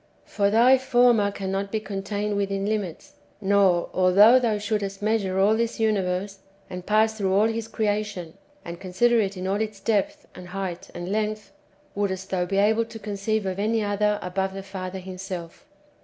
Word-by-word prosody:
For 200 -1 0
thy 245 +5 +5
Former 245 -5 +3
cannot 195 0 -3
be 220 - 0
contained 205 0 -3
wdthin 200 0 -1
limits; 205 -6 -4 0.2
nor, 195 -3 +3
although 200 +7 +6
thou 230 -4 0
shouldst 205 -1 -3
measure 205 -3 0
all 200 +3 +4
this 230 0 -2
[universe], 195 -2 -1 0.3
and 180 -1 -7
pass 220 +1 +3
through 195 -3 -1
all 200 +3 +4
His 225 0 -2
creation, 210 -6 -2 0.3
and 170 +1 -8
con 185 -2 -8
sider 240 +4 +4
it 200 -2 -1
in 185 - -5
all 195 +3 0
its 215 -2 -4
depth, 295 +9 -1
and 180 -1 -11
height, 180 -1 -5
and 175 +2 -5
length, 215 0 -2 0.4
wouldst 190 -2 -3
thou 180 -2 0
be 195 - -1
able 220 +3 +3
to 225 - -10
conceive 210 0 -2
of 190 0 -3
any 220 +1 +1
other 210 0 +1
above 190 +1 -2
the 195 - -6
Father 190 -1 -6
Himself. 185 - -8
200 Hz, 175 wpm, -24 LUFS, 190-215 Hz, 0.4 s, although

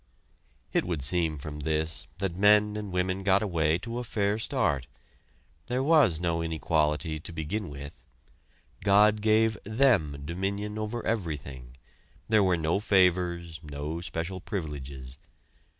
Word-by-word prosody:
It - - +2
would 85 -6 -3
seem 80 +1 +1
from 75 +1 -6
this, 80 +2 -2
that 95 -2 -2
men 105 +2 +4
and 105 -2 -5
women 90 +1 -1
got 100 +1 +3
away 80 -5 +1
to 115 +5 -5
a - - -3
fair 105 -2 0
start. 85 - 0 0.8
There 125 +2 0
was 140 - +4
no 85 -1 0
inequality 80 -1 0
to 80 - -6
begin 85 +5 -3
with. 70 0 -10 0.8
God 105 +1 +5
gave 110 0 +3
them 105 - +2
dominion 100 +5 -3
over 110 +2 -4
everything; 70 - -4 0.5
there 110 -1 +4
were 95 -2 +3
no 80 +3 0
favors, 90 -4 +2
no 75 +3 -5
special 90 +2 -4
privileges. 70 - -6
90 Hz, 135 wpm, -28 LUFS, 80-105 Hz, 0.8 s, God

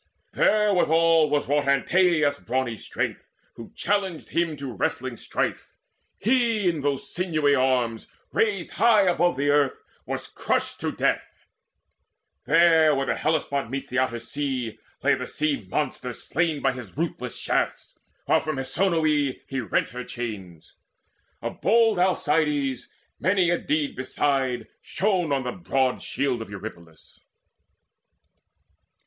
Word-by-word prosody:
There 210 -1 +3
withal 165 -3 +4
was 145 0 0
wrought 145 0 +1
Antaeus' 150 +1 +3
brawny 130 -2 -2
strength, - - -4 0.2
who 115 - -11
challenged 195 -5 -1
him 170 -3 0
To 135 -3 -6
wrestling 100 - -2
strife; - - -3 0.5
he 230 -4 +2
in 165 -4 0
those 140 -1 -2
sinewy 155 -5 +1
arms 125 -4 +1 0.3
Raised 200 -5 0
high 220 -1 +4
above 175 -4 +2
the 145 +1 +2
earth, 145 -2 +3 0.3
was - - -4
crushed - - -1
to - - -1
death. - - -2 1.0
There 165 -1 +5
where 135 0 0
swift - - -1
Hellespont 140 -5 0
meets 135 +2 -5
the 130 - +1
outer 130 -2 0
sea, 125 -1 -4 0.2
Lay - - +4
the - - -3
sea 145 -10 -2
monster 130 -1 -2
slain 155 +5 -1
by 135 - +3
his 125 -3 -10
ruthless 140 -7 -3
shafts, - - -1 0.3
While - - +4
from 155 -1 -3
Hesione 155 -2 +1
he 135 - -4
rent 110 - 0
her 125 +2 -6
chains. 100 -10 -7 0.7
Of - - -5
bold 225 -3 +4
Alcides 150 -7 +1 0.3
many 185 0 +2
a 175 - +1
deed 150 -2 -1
beside 130 -1 -1
Shone 185 -5 0
on 135 -2 +1
the 125 - -3
broad 135 -7 0
shield 130 -4 -1
of 110 - -7
Eurypylus. 85 -5 -10
145 Hz, 135 wpm, -25 LUFS, 130-170 Hz, 1.0 s, There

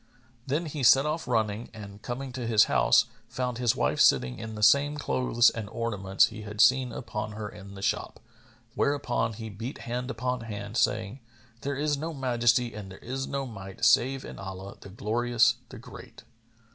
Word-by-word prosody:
Then 150 +6 0
he 150 -2 -5
set 135 +3 +6
off 155 0 -2
running, 110 -2 0
and 100 -1 -10
coming 130 +3 -5
to 125 -2 -5
his 110 -3 +6
house, - - +4 0.2
found 125 -2 -3
his 120 -2 +2
wife - - 0
sitting 65 -1 +4
in 110 0 -6
the 105 - -4
same 145 +5 +5
clothes 125 -4 +3
and 110 -3 -6
ornaments 100 -3 +1
he 110 -1 -9
had 105 0 -8
seen 125 +2 +5
upon 105 0 -5
her 105 0 -5
in 100 -1 -11
the 95 - -8
shop; - - -1 0.5
whereupon 120 -5 0
he 110 +1 -7
beat 115 +7 -7
hand 125 +2 -3
upon 125 0 -2
hand, 105 -1 -6
saying, 110 +2 0 0.4
"There 140 0 -2
is 145 +1 0
no 160 +2 -4
Majesty 120 -2 +1
and 105 -2 -8
there 95 - -10
is 135 +2 -4
no 140 -1 -3
Might 95 -5 -5
save 135 +2 +3
in - - -9
Allah, 95 0 -7
the - - -11
Glorious, 115 +3 +2
the 130 - -10
Great!" 125 +2 -12
115 Hz, 185 wpm, -28 LUFS, 105-130 Hz, 0.5 s, set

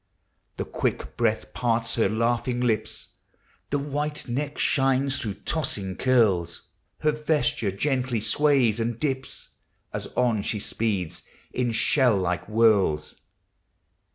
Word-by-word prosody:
The - - -2
quick - - -2
breath 110 -2 0
parts 115 -1 0
her 115 - +2
laughing 120 +2 0
lips. 120 -3 -1 0.6
The 145 - +1
white 145 +1 -3
neck 140 +4 -3
shines 135 0 +2
through 105 -5 -3
tossing 120 - -2
curls; 100 -10 +2 0.4
Her 150 - +3
vesture 150 -8 0
gently 125 +3 0
sways 120 0 +2
and 115 0 -2
dips, 135 -2 -3 0.4
As - - -4
on 115 -4 +2
she 105 +1 -2
speeds 100 -5 -2 0.3
in 125 -2 0
shell 120 0 +3
like 90 -2 -1
whirls. 105 -9 +3
120 Hz, 120 wpm, -25 LUFS, 110-135 Hz, 0.6 s, Her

